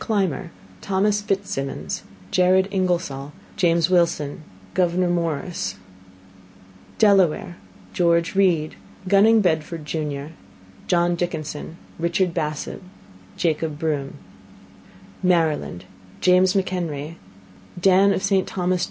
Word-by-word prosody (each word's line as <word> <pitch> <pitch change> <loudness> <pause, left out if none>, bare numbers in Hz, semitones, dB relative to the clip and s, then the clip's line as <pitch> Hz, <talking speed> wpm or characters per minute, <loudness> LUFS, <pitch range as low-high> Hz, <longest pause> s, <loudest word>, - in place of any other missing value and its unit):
Clymer 190 - -1 0.3
Thos 200 +2 +1
FitzSimons 195 -9 -3 0.3
Jared 185 +1 +4
Ingersoll 175 -7 -1 0.2
James 170 -4 +3
Wilson 170 -5 +1 0.3
Gouv 175 -1 +1
Morris 170 - -1 1.2
Delaware 190 -4 +3 0.4
Geo: 170 -1 +4
Read 175 -6 +2 0.3
Gunning 210 +3 +5
Bedford 160 -3 -1
jun 150 -1 -4 0.5
John 175 -1 +2
Dickinson 160 -2 -4 0.2
Richard 170 +1 +1
Bassett 150 -1 -3 0.6
Jaco: 160 -1 0
Broom 145 -3 -2 1.1
Maryland 160 - +1 0.3
James 185 +1 +4
Mchenry 170 -5 -2 0.6
Dan 195 +2 +5
of 190 - -1
St 195 -1 +1
Thos. 180 -1 0
175 Hz, 90 wpm, -22 LUFS, 155-190 Hz, 1.2 s, Gunning